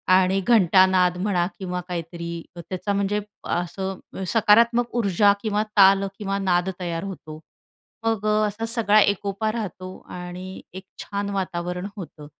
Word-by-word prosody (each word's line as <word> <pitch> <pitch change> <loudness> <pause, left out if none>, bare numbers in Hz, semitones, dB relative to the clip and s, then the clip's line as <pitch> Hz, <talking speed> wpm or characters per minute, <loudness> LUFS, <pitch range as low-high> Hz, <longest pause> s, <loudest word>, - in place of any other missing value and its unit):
आणि 190 +1 +3
घंटानाद 185 -4 +4
म्हणा 185 -4 +1
किंवा 180 -1 -3
काहीतरी 170 -1 -5 0.2
त्याचा, 185 +4 -4
म्हणजे 200 +1 0 0.3
असं 190 +2 -3 0.3
सकारात्मक 235 +2 +4
ऊर्जा 200 -2 +4
किंवा 215 -1 0
ताल 195 0 +7 0.2
किंवा 195 -1 -2
नाद 180 -1 +1
तयार 170 -1 -3
होतो. 155 -5 -8 0.7
मग 215 -2 0
अ, 210 0 +3
असा 225 +3 -4
सगळा 215 -3 +4
एकोपा 205 +2 0
राहतो 185 -4 -6 0.2
आणि 180 +1 -7
एक 190 +1 -9 0.2
छान 200 0 -4
वातावरण 180 0 -3
होतं. 155 -5 -9
190 Hz, 130 wpm, -23 LUFS, 180-205 Hz, 0.7 s, ताल